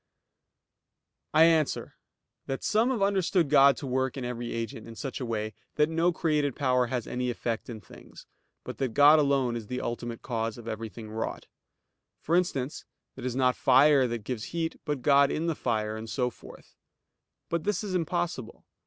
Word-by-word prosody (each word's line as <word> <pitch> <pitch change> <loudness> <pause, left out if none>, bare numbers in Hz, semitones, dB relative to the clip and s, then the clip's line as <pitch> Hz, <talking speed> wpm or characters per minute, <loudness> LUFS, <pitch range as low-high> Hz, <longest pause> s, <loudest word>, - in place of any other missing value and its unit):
I 155 - +6
answer 160 -3 +2 0.5
that, 135 - -4
Some 220 +4 +2
have 235 -6 0
understood 185 -5 +1
God 140 -1 +6
to 145 - -6
work 130 +1 -1
in 130 - -4
every 120 -1 -4
agent 115 -1 -5
in 115 - -10
such 135 +3 -5
a 125 - -3
way 110 -1 -3 0.2
that 150 +1 +3
no 165 +2 +2
created 150 -5 0
power 125 -3 +2
has 120 -2 -3
any 125 0 -2
effect 120 -1 -3
in 115 -2 -6
things, - - -15 0.4
but - - -8
that 130 -5 -2
God 145 +2 +7
alone 135 -4 +2
is 115 -3 -6
the 125 +2 -3
ultimate 120 -1 -5
cause 115 -3 -2
of 115 -1 -11
everything 110 0 -6
wrought; 110 +1 -4 0.7
for 165 - 0
instance, 150 -6 -1 0.3
that 130 - -11
it 125 - -3
is 125 - -3
not 125 -1 +2
fire 135 0 +5
that 115 -2 -4
gives 115 -1 -4
heat, 165 -1 -4
but 145 -4 -3
God 140 -1 +5
in 160 - -2
the 165 - +1
fire, 110 -6 -2
and 110 0 -7
so 125 0 -1
forth. - - -15 0.7
But 170 -1 -2
this 210 +3 -1
is 200 -3 -4
impossible. 170 - -3
130 Hz, 185 wpm, -28 LUFS, 120-155 Hz, 0.7 s, God